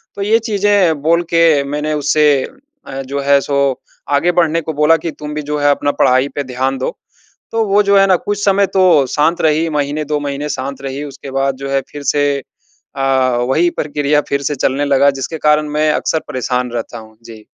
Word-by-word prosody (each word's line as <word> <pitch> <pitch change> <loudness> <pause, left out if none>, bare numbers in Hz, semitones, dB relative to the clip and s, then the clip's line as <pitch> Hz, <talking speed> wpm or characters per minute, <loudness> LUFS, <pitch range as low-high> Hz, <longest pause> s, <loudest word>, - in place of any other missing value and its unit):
तो 200 - -6
ये 215 +3 +3
चीज़ें 205 -8 +1
बोल 170 +3 +2
के 165 -4 +4
मैंने 150 +2 -3
उससे 150 +1 +1 0.6
अ, 135 0 -5
जो 140 +2 -4
है, 140 0 +4
सो 140 -2 0 0.3
आगे 175 +5 +2
बढ़ने 165 -1 +2
को 160 0 -5
बोला 150 +3 +4
कि, 165 +1 -5
"तुम 150 0 -8
भी 150 - -2
जो 150 +1 -3
है, 145 - +3
अपना 145 0 0
पढ़ाई 130 +2 +3
पे 145 - -2
ध्यान 130 +1 -2
दो।" 130 - -2 0.6
तो 225 0 +1
वो 200 +1 +3
जो 200 0 +3
है 195 - +5
ना, 185 - +4
कुछ 205 +3 -3
समय 200 0 +3
तो 185 - +5 0.3
शांत 160 +3 +1
रही, 160 +1 +2
महीने, 145 +1 -2
2 150 0 -1
महीने 145 +1 -4
शांत 135 0 -5
रही, 135 +2 -5
उसके 140 -1 -10
बाद 135 -1 0
जो 140 - -4
है, 135 0 +1
फिर 145 -1 -8
से 145 -1 +2 0.7
अ, 130 -2 +1
वही 170 +6 +2
प्रक्रिया 145 0 0
फिर 140 0 0
से 145 0 -1
चलने 135 +2 0
लगा, 140 0 +3
जिसके 160 +5 -4
कारण 150 0 +3
मैं 150 +1 +1
अक्सर 160 - -1
परेशान 125 -2 -2
रहता 120 0 -5
हूँ। 110 0 -15
जी। 110 -2 -13
145 Hz, 210 wpm, -16 LUFS, 135-160 Hz, 0.7 s, है